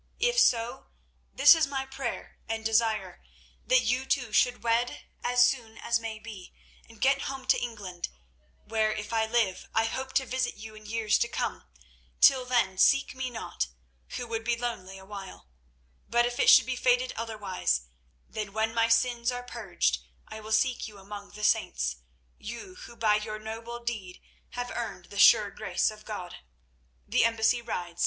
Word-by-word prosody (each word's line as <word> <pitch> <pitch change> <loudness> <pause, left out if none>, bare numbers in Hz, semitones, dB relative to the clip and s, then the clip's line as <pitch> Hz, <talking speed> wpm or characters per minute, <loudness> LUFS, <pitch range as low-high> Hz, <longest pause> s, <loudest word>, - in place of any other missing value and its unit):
If 485 +1 +3
so, 230 - +2 0.4
this - - +8
is 320 -3 +2
my 270 -1 -3
prayer 265 -2 -6
and 225 0 -3
desire—that 225 - 0
you 260 +2 0
two 245 -5 0
should 245 -1 +2
wed 235 +1 0 0.2
as 245 0 +5
soon 230 -4 -2
as 235 0 0
may 225 -1 -5
be, 215 -4 -11 0.3
and 225 -1 -16
get 275 +1 +2
home 270 -1 -6
to - - +3
England, 205 -7 -5 0.6
where, 220 -1 +1
if 210 +1 -5
I 220 -1 +2
live, 220 -5 0
I 225 0 +3
hope 260 +3 -4
to 265 0 +2
visit 255 -1 -1
you 220 0 -9
in 215 0 -13
years 220 -1 +1
to 235 - +2
come. - - -3 0.5
Till 260 -2 +6
then 230 -7 +1
seek 275 0 +4
me 260 -1 -3
not, 225 - -4 0.5
who 245 - -4
would 225 -1 -4
be 235 +1 0
lonely 225 -6 -4
a 190 - -13
while. 195 - -9 0.6
But 240 +1 +3
if 240 0 -3
it 465 - +5
should - - +8
be - - -2
fated - - +2
otherwise, 200 - -1 0.5
then 210 -2 -5
when 220 +1 0
my 230 0 +3
sins 235 +1 +2
are 245 0 -5
purged 190 - -1 0.3
I 220 - -8
will 215 0 -9
seek 245 +3 +1
you 210 -2 -12
among 200 +1 -9
the 210 +1 -9
saints, - - +1 0.4
you 235 - -8
who 235 - -13
by 215 -2 +3
your 215 0 -5
noble 225 +2 -7
deed 210 -7 -5 0.4
have 245 0 -3
earned 225 -6 -6
the 200 - -5
sure 205 0 +7
grace 195 -1 0
of 215 0 -14
God. 185 -5 -6 0.7
"The - - +3
embassy 230 +1 +2
rides. 175 -7 -5
225 Hz, 175 wpm, -28 LUFS, 210-245 Hz, 0.7 s, this